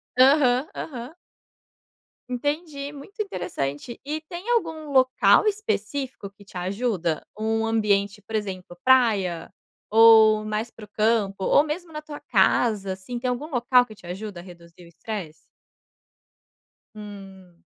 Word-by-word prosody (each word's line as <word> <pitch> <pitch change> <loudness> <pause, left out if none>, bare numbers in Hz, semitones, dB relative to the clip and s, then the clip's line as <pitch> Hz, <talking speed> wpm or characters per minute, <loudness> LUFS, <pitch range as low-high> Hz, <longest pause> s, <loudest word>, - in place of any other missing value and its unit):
Aham, 260 0 +5
aham. 255 0 -7 1.1
Entendi, 290 +2 -3
muito 295 +9 -8
interessante. 145 - -4
E 300 +2 -3
tem 345 +7 -9
algum 320 -10 -1
local 260 +9 +4
específico 280 - -2
que 200 +1 -19
te 195 - -11
ajuda 185 -3 -2
ou 215 - -5 0.2
um - - 0
ambiente, 210 -2 +1
por 220 +2 -7
exemplo 185 -4 -5
praia 210 -10 +3 0.4
ou 220 -1 +7
mais 215 +2 -3
para 225 - -14
o 210 - -10
campo 210 -3 0
ou 285 - +5
mesmo 325 +2 -5
na 305 - -5
tua 300 -1 -9
casa, 210 -5 +2
assim, 190 +6 -7
tem 250 +1 -2
algum 250 +5 -3
local 250 -1 +3
que 215 - -13
te 190 - -17
ajuda 185 +1 -6
a - - -14
reduzir 170 -1 -15
o 170 - -15
estresse? 170 -1 -6 1.6
Hum. 195 -4 -12
225 Hz, 140 wpm, -24 LUFS, 195-280 Hz, 1.6 s, ou